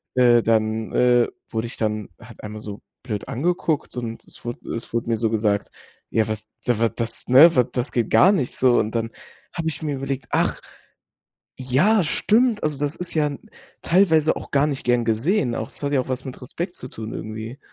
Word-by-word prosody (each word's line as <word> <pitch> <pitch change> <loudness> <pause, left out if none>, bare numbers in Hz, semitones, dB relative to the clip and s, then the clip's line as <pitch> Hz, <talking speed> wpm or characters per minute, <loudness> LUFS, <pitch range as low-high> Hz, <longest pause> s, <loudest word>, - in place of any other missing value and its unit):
äh, 120 -2 +5
dann, 110 0 +1
äh, 120 -1 +4 0.2
wurde 110 0 -2
ich - - -9
dann 105 -2 -2
halt - - -14
einmal 105 0 -7
so 105 -1 -8 0.2
blöd 110 -5 -4
angeguckt 160 0 -1
und 115 -2 -5
es - - -14
wurde 120 0 -4 0.2
es 115 - -7
wurde 115 0 -1
mir 115 - +2
so 110 0 +1
gesagt, 105 -2 0 0.4
ja 110 0 +2
was, 110 0 -4 0.2
da 120 -2 +2
w 115 - +4
das, 115 -1 -4
ne, 145 +7 +8
w 125 - +5
das 125 +2 -2
geht 120 -3 -1
gar 190 - +7
nicht 155 -12 -1
so, 125 -2 +4
und 110 - -1
dann 115 0 -1 0.4
habe 165 -2 -2
ich 160 - -7
mir 150 -2 -2
überlegt: 135 -2 -4
„Ach, - - +1 1.0
ja, 170 - +3
stimmt“, 220 +7 +2
also 150 -2 -1
das 145 +1 -1
ist 180 -1 -7
ja 155 -2 +2
'n 150 +10 -7 0.3
teilweise 165 -4 +3
auch - - -8
gar 140 +1 +3
nicht 140 -3 -4
gern 120 -1 +2
gesehen, 120 - +1
auch 110 - -4
es - - -9
hat 140 - -1
ja 140 - +3
auch 130 - -6
was 130 0 -3
mit 130 - -8
Respekt 175 +8 -5
zu - - -7
tun 110 -2 -7
irgendwie. 110 +4 -6
125 Hz, 210 wpm, -23 LUFS, 115-150 Hz, 1.0 s, ne